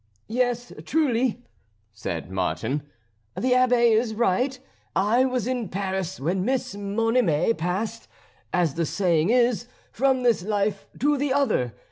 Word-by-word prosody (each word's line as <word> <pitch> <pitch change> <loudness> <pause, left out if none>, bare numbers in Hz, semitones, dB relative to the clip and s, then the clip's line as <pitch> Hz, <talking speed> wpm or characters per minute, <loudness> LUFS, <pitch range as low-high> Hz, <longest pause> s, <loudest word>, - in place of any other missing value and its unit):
"Yes, 245 0 -1
truly," 255 -5 +1 0.5
said 90 -5 -5
Martin, 95 +10 -1 0.5
"the 255 - 0
Abbé 250 -2 +4
is 220 0 +1
right. 245 +4 +1 0.4
I 225 +7 +3
was 255 -3 -1
in 245 -5 -2
Paris 190 -1 -3
when 180 +6 0
Miss 255 -1 -1
Monime 205 -2 +1
passed, 195 +7 -3 0.4
as 175 -5 +1
the 165 0 -1
saying 170 -2 +1
is, 240 -1 +2 0.2
from 260 +1 +1
this 235 -5 +3
life 200 0 -1
to 290 +1 +2
the 285 -1 0
other. 220 - +1
225 Hz, 130 wpm, -25 LUFS, 185-250 Hz, 0.5 s, Abbé